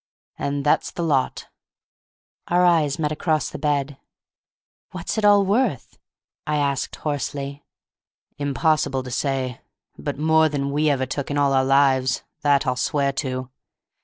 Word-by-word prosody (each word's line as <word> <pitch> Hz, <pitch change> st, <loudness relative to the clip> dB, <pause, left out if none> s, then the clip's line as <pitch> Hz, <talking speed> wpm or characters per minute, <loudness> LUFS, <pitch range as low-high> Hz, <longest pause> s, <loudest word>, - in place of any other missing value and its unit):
And 140 Hz, 0 st, -2 dB
that's 145 Hz, -, +2 dB
the 170 Hz, -, -4 dB
lot." 140 Hz, -5 st, 0 dB, 1.0 s
Our 180 Hz, +1 st, +3 dB
eyes 160 Hz, -5 st, +3 dB
met 150 Hz, -2 st, -1 dB
across 155 Hz, 0 st, 0 dB
the -, -, -7 dB
bed. 145 Hz, -2 st, -1 dB, 0.9 s
"What's -, -, -4 dB
it -, -, -3 dB
all 205 Hz, -1 st, +6 dB
worth?" 205 Hz, -, 0 dB, 0.5 s
I 150 Hz, -, 0 dB
asked, 140 Hz, -2 st, -1 dB
hoarsely. 140 Hz, -1 st, -4 dB, 0.8 s
"Impossible 145 Hz, -1 st, +1 dB
to 125 Hz, -, -8 dB
say. 130 Hz, -1 st, -2 dB, 0.4 s
But 75 Hz, -, -4 dB
more 160 Hz, +1 st, +3 dB
than 145 Hz, -2 st, -2 dB
all 140 Hz, -, -2 dB
we 150 Hz, +2 st, +2 dB
ever 135 Hz, -2 st, +1 dB
took 135 Hz, +2 st, -4 dB
in 145 Hz, -, -2 dB
all 140 Hz, -1 st, +3 dB
our 135 Hz, 0 st, +3 dB
lives. 135 Hz, -1 st, +3 dB, 0.2 s
That 145 Hz, -1 st, +3 dB
I'll 125 Hz, -1 st, 0 dB
swear 140 Hz, +1 st, 0 dB
to." 130 Hz, -2 st, -4 dB
145 Hz, 150 wpm, -23 LUFS, 135-155 Hz, 1.0 s, all